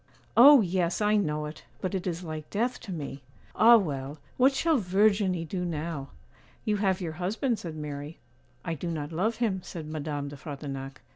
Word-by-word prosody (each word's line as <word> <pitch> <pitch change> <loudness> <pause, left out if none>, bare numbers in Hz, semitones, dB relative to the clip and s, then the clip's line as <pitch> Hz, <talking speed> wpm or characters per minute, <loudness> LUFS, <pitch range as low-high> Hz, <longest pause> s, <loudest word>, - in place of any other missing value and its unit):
'Oh! 275 +2 +9
yes, 180 -2 0
I 210 0 +3
know 150 -7 0
it; 150 +1 -8 0.2
but 185 - -3
it 190 0 -2
is 175 0 -3
like 155 -2 -6
death 240 +4 -1
to 210 - -8
me! 145 -5 -5 0.3
Ah, 235 +2 +8
well, 145 -7 -3 0.2
what 260 +2 +5
shall 310 +1 +2
Verginie 195 -2 +2
do 180 +2 -3
now?' 155 -4 -4 0.6
'You 210 -1 +1
have 195 -2 +1
your 170 -3 -3
husband,' 210 - -1
said 165 -3 -6
Mary. 150 0 -6 0.5
'I 165 - -1
do 170 +2 -4
not 155 -2 -4
love 205 +8 0
him,' 210 -6 0
said 165 -3 -7
Madame 150 -2 -4
de 145 - -9
Frontignac. 135 -2 -7
175 Hz, 185 wpm, -28 LUFS, 150-210 Hz, 0.6 s, Oh